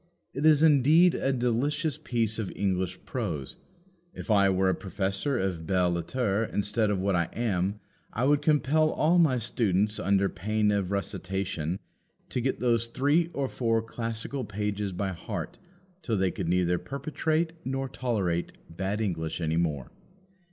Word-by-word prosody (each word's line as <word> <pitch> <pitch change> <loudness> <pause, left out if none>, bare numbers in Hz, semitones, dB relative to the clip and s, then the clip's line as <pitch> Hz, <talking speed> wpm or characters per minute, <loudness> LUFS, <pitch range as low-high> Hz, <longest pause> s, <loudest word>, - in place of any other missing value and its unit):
It 145 +4 +1
is 155 -1 +5
indeed 155 +4 +6
a 135 - 0
delicious 135 +5 0
piece 115 -3 -1
of 105 - -3
English 95 -2 -1
prose. 85 - -4 0.6
If - - -5
I 100 -2 +5
were 95 0 +2
a - - +3
professor 95 +8 -2
of 90 -6 -2
belles 90 -1 +2
lettres 105 +5 -1
instead 105 +1 0
of 100 -2 0
what 95 0 +1
I 85 -1 +1
am, 100 -3 -1 0.3
I 115 - -2
would 145 +1 +3
compel 155 +1 +3
all 165 +3 +3
my 150 -7 +4
students, 105 -3 0
under 100 0 +2
pain 105 +3 0
of 100 -3 0
rustication, 95 -4 -2 0.5
to 125 - -2
get 130 +2 -1
those 115 -2 +2
three 145 +8 +2
or 140 -1 -1
four 115 -3 0
classical 115 +3 -4
pages 105 -1 -3
by 95 +2 -2
heart 90 -2 -6 0.4
till 115 -9 -1
they 95 -1 +1
could 85 -3 -3
neither 90 0 +2
perpetrate 155 +4 -1
nor 135 0 -2
tolerate 100 -10 -1 0.2
bad 100 +4 -2
English 80 -6 -2
any 80 -1 0
more. 75 -7 -1
105 Hz, 155 wpm, -28 LUFS, 95-130 Hz, 0.6 s, indeed